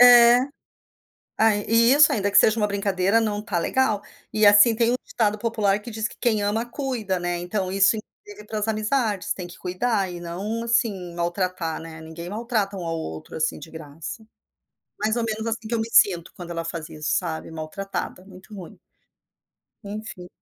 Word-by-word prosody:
É. 240 -1 +9 1.0
Aí 215 -2 +3 0.3
isso, 295 +1 +7
ainda 205 -1 0
que 200 - +4
seja 220 +2 +5
uma 210 - +2
brincadeira, 200 +1 +1
não 210 -2 -1
está 195 -5 -2
legal. 215 +1 +1 0.3
E, 215 - +1
assim, 205 +3 +7
tem 230 +1 +2
um 250 - +2
ditado 215 -2 0
popular 210 -3 +1
que 235 +3 -9
diz 215 -1 -2
que - - -15
quem 220 -3 +1
ama 220 +3 0
cuida, 240 -7 -3
né? 175 0 -2
Então 185 +1 -2
isso, 195 +3 +4 0.5
pras 215 0 -2
amizades. 215 -2 0
Tem 180 - -7
que 175 - -13
cuidar 190 +1 -1
e 175 - -7
não, 195 +7 -4
assim, 215 -7 0
maltratar, 175 -1 -2
né? 160 -1 -10
Ninguém 160 +2 -8
maltrata 215 -2 -1
um 180 - -5
ao 165 0 -2
outro 80 - -7
assim, 155 0 -1
de 165 - -10
graça. 160 +7 -8 0.7
Mais 215 +3 0
ou 235 - 0
menos 220 0 -3
assim 225 -1 -3
que 235 - -1
eu 225 - 0
me 225 - -4
sinto 175 -7 +4
quando 175 -1 -7
ela 165 0 -3
faz 165 -2 -5
isso, 155 0 -4
sabe? 165 -2 -4
Maltratada. 180 +3 -5
Muito 195 +2 -13
ruim. 185 -4 -10 1.0
Enfim. 200 -3 -7
205 Hz, 180 wpm, -24 LUFS, 175-225 Hz, 1.0 s, É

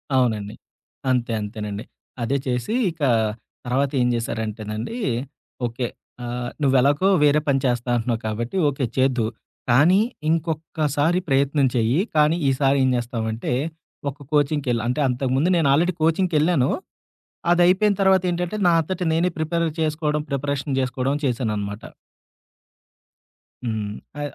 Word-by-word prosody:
అవునండి. 110 -5 +1 0.5
అంతే, 125 -2 +1
అంతేనండి. 105 0 -5 0.4
అదే 135 +4 +1
చేసి 125 - -1 0.2
ఇక 165 -1 -17 0.6
తర్వాత 135 +3 +1
ఏం 125 - +3
చేశారంటేనండి, 110 - -4 0.7
ఓకే. 120 +1 -2 0.4
ఆహ్, 120 0 -3
"నువ్వెలాగో 140 +6 +3 0.2
వేరే 150 0 +5
పని 135 -1 +3
చేస్తా 120 -1 0
అంటున్నావు 115 -1 -1
కాబట్టి 115 - -3
ఓకే, 135 -1 -2
చేద్దువు. 125 -4 +2 0.4
కానీ, 160 +11 +5 0.3
ఇంకొక్కసారి 160 0 0
ప్రయత్నం 140 +1 +3
చేయి. 120 +6 +2 0.2
కానీ, 155 +2 +4
ఈసారి 135 +1 +2
ఏం 130 - +3
చేస్తావంటే, 115 -1 -3 0.6
ఒక 140 - -17 0.2
కోచింగ్‌కి 145 -2 +1
ఎళ్" 115 - 0
అంటే 125 +4 0
అంతకుముందు 130 +5 +1
నేను 160 -4 +3
ఆల్రెడీ 175 +5 +2
కోచింగ్‌కెళ్లాను. 160 -4 +2 0.8
అది 175 0 +4
అయిపోయిన 200 +3 +4
తర్వాతేంటంటే, 180 -1 +2
నా - - +5
అంతట 185 +3 -5
నేనే 170 +3 +2
ప్రిపేర్ 165 +2 0
చేసుకోవడం, 150 -1 0
ప్రిపరేషన్ 140 0 -2
చేసుకోవడం 130 +1 -1
చేశాననమాట. 105 -5 -2 1.8
హ్మ్. 110 -3 -2 0.3
అ - - -3
135 Hz, 120 wpm, -23 LUFS, 120-155 Hz, 1.8 s, వేరే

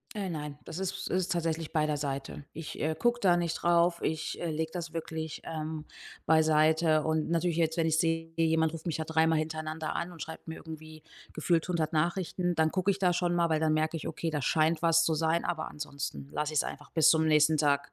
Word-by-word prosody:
Äh, 195 -3 -3
nein, 150 -3 -5
das 165 - -7
ist 190 -1 -3
ist 185 -1 0
tatsächlich 165 -2 -1
bei 155 -1 +2
der 150 -1 -1
Seite. 140 0 -4
Ich, 160 -1 -7
äh, 155 +1 0
gucke 240 +8 +1
da 180 -3 +4
nicht 170 -1 -1
drauf, 170 0 +3
ich, 160 -1 -2
äh, 170 - -2
lege 160 +1 -2
das 170 -2 -5
wirklich, 160 -1 -5
ähm, 155 -1 -5 0.4
beiseite. 155 0 +4
Und 160 0 0
natürlich 170 0 +1
jetzt, 160 0 +1
wenn 165 - +2
ich 160 0 +2
sehe, 165 -1 0
jemand 160 -1 +2
ruft 165 0 -8
mich 165 - -1
da 160 - -3
dreimal 160 0 +2
hintereinander 155 0 -3
an 175 - -3
und 165 -3 -8
schreibt 160 +1 -9
mir 160 - -5
irgendwie 155 -1 -10 0.3
gefühlt 165 +2 +1
100 165 -3 0
Nachrichten, 175 +2 0
dann 160 -1 +2
gucke 190 +1 +1
ich 195 - 0
da 180 -2 +3
schon 175 0 0
mal, 170 -1 +2
weil 155 -1 +2
dann 155 -1 +2
merke 155 +1 0
ich: - - -5
„Okay, 165 +1 -3
da 150 -2 -2
scheint 155 +4 +2
was 165 0 +4
zu 160 - +2
sein“, 160 +2 +1
aber 160 -2 -2
ansonsten 140 - -6
lasse 150 +1 -2
ich 150 - +4
es - - -1
einfach 145 -1 -7
bis 160 0 +5
zum 160 0 +3
nächsten 155 0 +4
Tag 140 -1 +1
160 Hz, 230 wpm, -30 LUFS, 155-170 Hz, 0.4 s, bis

